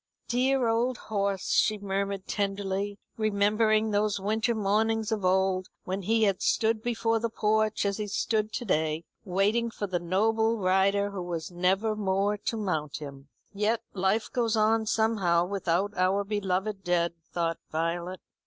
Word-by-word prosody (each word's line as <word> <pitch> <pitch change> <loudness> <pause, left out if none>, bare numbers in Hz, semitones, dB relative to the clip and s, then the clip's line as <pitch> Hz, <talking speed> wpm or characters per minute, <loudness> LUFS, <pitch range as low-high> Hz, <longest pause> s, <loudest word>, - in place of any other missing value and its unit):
"Dear 255 +1 +2
old 235 +2 +1
horse," 200 -2 -2
she 215 -1 +3
murmured 195 -1 -3
tenderly, 200 0 -2 0.2
remembering 215 +1 +2
those 205 0 +1
winter 220 +4 0
mornings 220 +2 +1
of 215 -3 -1
old 185 0 +2 0.2
when 190 +2 -3
he 225 +4 +2
had 195 -3 +2
stood 220 -1 +1
before 225 -1 0
the 230 +1 -1
porch 215 -1 +1
as 200 -1 0
he 210 -1 -3
stood 215 +1 0
to 245 - -3
day, 160 -4 0 0.2
waiting 205 +5 +1
for 215 - -4
the 185 -3 -1
noble 220 +6 +1
rider 195 +1 +2
who 195 -2 -5
was 175 -1 -4
never 190 +5 +1
more 200 0 +1
to 225 +3 -3
mount 160 -8 -2
him. 140 -2 -10 0.2
"Yet 215 +3 0
life 195 +3 0
goes 235 -2 +1
on 220 +1 +2
somehow 200 -7 +2
without 195 +1 -1
our 190 +2 +2
beloved 195 0 -2
dead," 170 -1 +1 0.2
thought 165 -1 -1
Violet. 170 +3 -2
200 Hz, 155 wpm, -28 LUFS, 185-220 Hz, 0.2 s, she